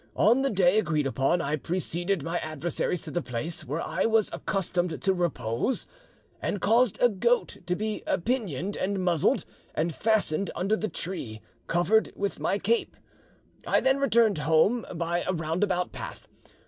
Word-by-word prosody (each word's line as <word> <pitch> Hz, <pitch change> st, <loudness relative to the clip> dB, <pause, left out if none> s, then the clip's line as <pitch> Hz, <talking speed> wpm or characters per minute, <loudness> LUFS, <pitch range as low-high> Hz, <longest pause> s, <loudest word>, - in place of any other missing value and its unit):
On 235 Hz, +7 st, +4 dB
the 275 Hz, -, +1 dB
day 190 Hz, -1 st, +4 dB
agreed 155 Hz, -8 st, 0 dB
upon, 135 Hz, +6 st, +1 dB
I 145 Hz, 0 st, 0 dB
preceded 175 Hz, +2 st, -1 dB
my 170 Hz, +2 st, -2 dB
adversaries 155 Hz, +2 st, -2 dB
to -, -, -7 dB
the 175 Hz, -, -1 dB
place 140 Hz, +6 st, -3 dB
where 150 Hz, +6 st, -3 dB
I -, -, 0 dB
was 220 Hz, -2 st, +2 dB
accustomed 180 Hz, -4 st, -1 dB
to 195 Hz, -, +2 dB
repose, 155 Hz, -, -1 dB, 0.6 s
and 205 Hz, -, -2 dB
caused 225 Hz, +4 st, +3 dB
a 245 Hz, -, +6 dB
goat 235 Hz, +3 st, +1 dB
to 180 Hz, -, +1 dB
be 215 Hz, +2 st, -3 dB, 0.2 s
pinioned 205 Hz, -, -1 dB
and 200 Hz, +1 st, -1 dB
muzzled, 170 Hz, -4 st, +2 dB, 0.3 s
and 165 Hz, +2 st, 0 dB
fastened 200 Hz, -4 st, +1 dB
under 195 Hz, +5 st, +1 dB
the 215 Hz, 0 st, -2 dB
tree, 125 Hz, -, -5 dB, 0.3 s
covered 175 Hz, +6 st, +2 dB
with 200 Hz, 0 st, -3 dB
my 200 Hz, -, 0 dB
cape; 225 Hz, +4 st, 0 dB, 0.7 s
I -, -, +4 dB
then 265 Hz, +1 st, +2 dB
returned 230 Hz, -, +3 dB
home 160 Hz, -, +2 dB
by 170 Hz, +1 st, -1 dB
a 185 Hz, -, -1 dB
roundabout 175 Hz, +3 st, -1 dB
path. -, -, -8 dB
180 Hz, 160 wpm, -27 LUFS, 165-215 Hz, 0.7 s, a